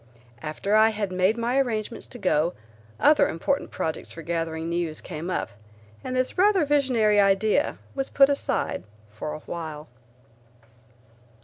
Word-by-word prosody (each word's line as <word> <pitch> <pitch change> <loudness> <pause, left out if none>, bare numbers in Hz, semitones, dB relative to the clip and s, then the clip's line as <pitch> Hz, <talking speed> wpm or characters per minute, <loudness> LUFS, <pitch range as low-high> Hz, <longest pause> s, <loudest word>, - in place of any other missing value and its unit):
After 195 +7 -1
I 220 +1 +6
had 210 -3 -3
made 185 +4 +2
my 240 +3 +1
arrangements 230 -4 -2
to 245 - -9
go, 175 -5 +1 0.5
other 300 - +5
important 275 - -1
projects 160 - -4
for 165 - -9
gathering 165 -1 -2
news 170 -2 -2
came 165 +1 -6
up, 185 - -2 0.5
and 255 - -4
this 255 +7 -1
rather 385 -4 +4
visionary 250 -8 +3
idea 200 +7 +2 0.2
was 270 -1 -2
put 275 -1 +6
aside 280 - -1 0.3
for 150 +8 -5
a 155 - -9
while. 155 -2 -7
205 Hz, 140 wpm, -25 LUFS, 165-255 Hz, 0.5 s, I